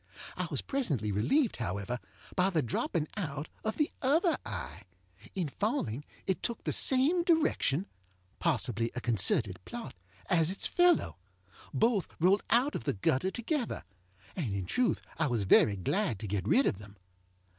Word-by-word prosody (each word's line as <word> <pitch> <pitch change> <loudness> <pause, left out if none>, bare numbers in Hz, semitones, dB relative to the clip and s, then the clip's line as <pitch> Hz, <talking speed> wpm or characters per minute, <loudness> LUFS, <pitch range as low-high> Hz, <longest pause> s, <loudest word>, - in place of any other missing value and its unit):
I - - -3
was - - -2
presently 145 - -1
relieved, 235 - +1
however, 105 +2 -3 0.4
by 185 0 +3
the 165 -6 +1
dropping 150 +6 -1
out 150 -5 -4
of 220 - -2
the 300 - +1
other 315 +5 +3
eye. 70 +8 -6 0.5
In 180 -4 -1
falling 150 - -2 0.2
it 190 - -1
took 235 - -3
the - - -1
same 275 +7 +4
direction 305 - +2 0.5
(possibly 120 -7 0
a - - -1
concerted 105 -3 +2
plot) 240 -1 -7 0.3
as 165 -3 +4
its 190 - -1
fellow. 350 - +3 0.5
Both 205 - +2
rolled 185 +5 +4
out 250 +5 +4
of - - -5
the - - +1
gutter 130 - +1
together, 240 +4 -3 0.5
and 125 - -2
in 95 -2 -3
truth 250 - 0 0.2
I 160 - +2
was 120 -6 0
very 100 +2 +5
glad 115 - -1
to 110 - -4
get 100 -1 -2
rid 270 - +4
of 95 - 0
them. 105 -1 -13
165 Hz, 155 wpm, -31 LUFS, -, 0.5 s, very